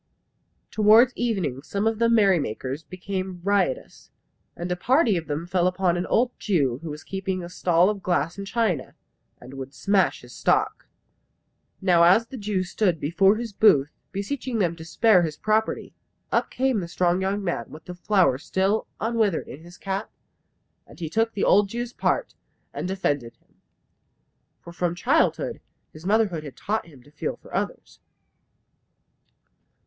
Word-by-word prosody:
Towards 220 +4 +6
evening 185 - -1
some 200 +7 -3
of 225 -1 0
the 230 0 +3
merrymakers 160 - +1
became 185 +1 -5
riotous; 195 -8 -1 0.5
and 175 +1 -5
a - - +1
party 245 - +3
of 165 -2 -3
them 150 +2 -3
fell 180 0 +1
upon 180 -1 +1
an 175 +1 -2
old 245 +2 +2
Jew 140 - +1
who 165 - -6
was 150 +1 -7
keeping 190 -1 -3
a 175 - -7
stall 175 0 +3
of 205 -1 -1
glass 175 -2 0
and 200 0 -7
china, 205 - -1 0.4
and 125 +2 -12
would 135 0 -8
smash 195 -2 +1
his 125 0 -14
stock. - - 0 0.9
Now 180 -3 +4
as 190 +7 +5
the 265 +2 -9
Jew 200 -3 -1
stood 180 -2 0
before 190 +7 +3
his 230 -1 -5
booth 150 -9 +4 0.2
beseeching 235 +5 -3
them 175 -5 +1
to 160 - -9
spare 190 +3 +4
his 155 -3 -3
property, 215 +1 0 0.4
up - - +1
came 260 -3 0
the 175 - -4
strong 175 +1 +1
young 195 +2 -1
man, 170 -11 -2
with 155 - -12
the 180 - -7
flower 175 -7 +2
still 195 +7 0
unwithered 220 -5 0
in 145 - -10
his 175 +1 -14
cap, 195 +1 -4 0.8
and - - -15
he 160 -2 -5
took 225 +3 +1
the 200 - -2
old 200 0 +4
Jew's 240 +2 -4
part - - -1 0.4
and - - -4
defended 145 -11 -2
him. - - -37 1.0
For 170 - -11
from 175 0 -1
childhood 180 - +1 0.3
his 155 +4 -9
mother 220 +1 +3
had 155 -6 -7
taught 215 -2 -2
him 140 -7 -16
to 145 - -20
feel 150 - -4
for - - -17
others. - - -4
185 Hz, 165 wpm, -25 LUFS, 165-210 Hz, 1.0 s, Towards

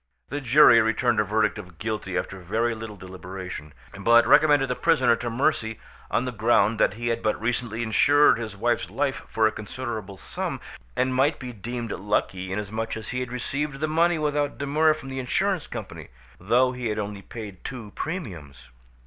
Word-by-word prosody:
The 145 +1 -3
jury 130 -2 +7
returned 115 +1 +1
a - - +4
verdict 105 0 +1
of 90 -4 -11
guilty 105 -2 -3
after 95 - -4
very 115 +7 0
little 110 -1 -7
deliberation, 95 -3 -8 0.3
but 120 +3 +5
recommended 145 -2 +5
the 125 - -1
prisoner 130 -8 +3
to 120 0 -3
mercy 115 -3 0 0.3
on 125 - 0
the 125 - -2
ground 110 -1 +2
that 105 - +3
he 120 +1 -2
had 115 0 -1
but 110 - 0
recently 115 0 -2
insured 145 +6 +4
his 110 -3 -6
wife's 120 +3 0
life 140 -1 -1
for 110 - +1
a 110 - +4
considerable 110 -3 -6
sum, - - -4 0.4
and 130 0 +1
might 140 +4 +2
be 125 -2 -7
deemed 115 +1 -5
lucky 95 -2 -2
inasmuch 110 +3 -3
as 110 - -8
he 125 - -2
had 125 -1 -4
received 135 +3 -3
the 155 - 0
money 165 +2 +2
without 145 -1 -1
demur 155 +2 +2
from 135 -3 -9
the 130 0 -4
insurance 185 +7 0
company, - - -7 0.3
though 120 +7 +3
he 125 -1 -4
had 105 0 -2
only 105 -1 -4
paid 105 -4 -9
two 120 -6 -7
premiums. 95 - -6
115 Hz, 185 wpm, -25 LUFS, 105-135 Hz, 0.4 s, jury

